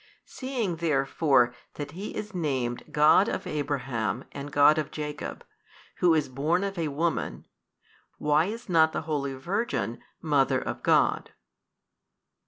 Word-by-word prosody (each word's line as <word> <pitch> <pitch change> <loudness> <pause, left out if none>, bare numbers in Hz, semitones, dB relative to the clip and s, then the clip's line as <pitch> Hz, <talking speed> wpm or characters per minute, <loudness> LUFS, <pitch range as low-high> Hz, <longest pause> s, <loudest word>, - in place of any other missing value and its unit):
Seeing 240 -10 -3
therefore 135 -5 +2 0.2
that 145 -1 -6
He 190 +6 -7
is 210 0 -5
named 130 -8 -2
God 150 +7 +5
of - - -3
Abraham 135 -5 -2
and 140 +1 -7
God 145 +2 +5
of 150 - -3
Jacob, 150 -1 -6 0.5
Who 175 -2 +4
is 155 -2 +1
born 150 +8 0
of 200 0 -3
a 165 -3 -1
woman, 160 +4 -2 0.7
why 150 +2 +3
is 230 +5 -6
not 160 -3 +4
the - - -1
holy 140 -3 -2
Virgin 135 - -2 0.2
Mother 145 -4 +2
of - - -5
God? - - +2
150 Hz, 135 wpm, -27 LUFS, 140-170 Hz, 0.7 s, God